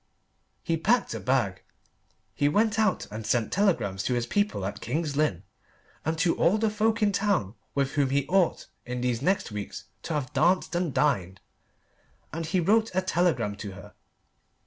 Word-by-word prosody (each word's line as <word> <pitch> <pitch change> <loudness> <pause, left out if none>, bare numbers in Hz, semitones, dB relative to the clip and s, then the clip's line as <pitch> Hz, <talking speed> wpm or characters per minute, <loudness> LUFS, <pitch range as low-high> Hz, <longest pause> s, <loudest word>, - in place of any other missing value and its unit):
He 165 -2 0
packed 230 +9 +2
a - - -4
bag. 125 -8 0 0.7
He 145 - +2
went 215 +6 +2
out 215 -3 +2
and 110 +1 -5
sent 110 +1 0
telegrams 165 - +1
to 125 - +1
his 120 -1 0
people 205 - 0
at 100 - -5
King's 145 +4 -2
Lynn, 140 - 0 0.6
and 160 +1 -1
to 165 +1 +2
all 195 +5 +3
the 220 0 +1
folk 220 +1 +1
in 205 - +4
town 195 - 0 0.2
with 140 -1 +1
whom 145 -3 +1
he 140 0 +1
ought 190 -2 +2 0.2
in 125 0 -4
these 125 -1 0
next 190 - 0
weeks 105 -1 -6 0.2
to 160 - -3
have 150 -1 -3
danced 175 +7 +2
and 175 -2 0
dined, 100 -12 0 0.9
and 165 0 -3
he 180 +3 +1
wrote 215 +6 +3
a 185 - +2
telegram 175 - +1
to 100 -1 -6
her. 95 0 -12
155 Hz, 175 wpm, -27 LUFS, 120-190 Hz, 0.9 s, in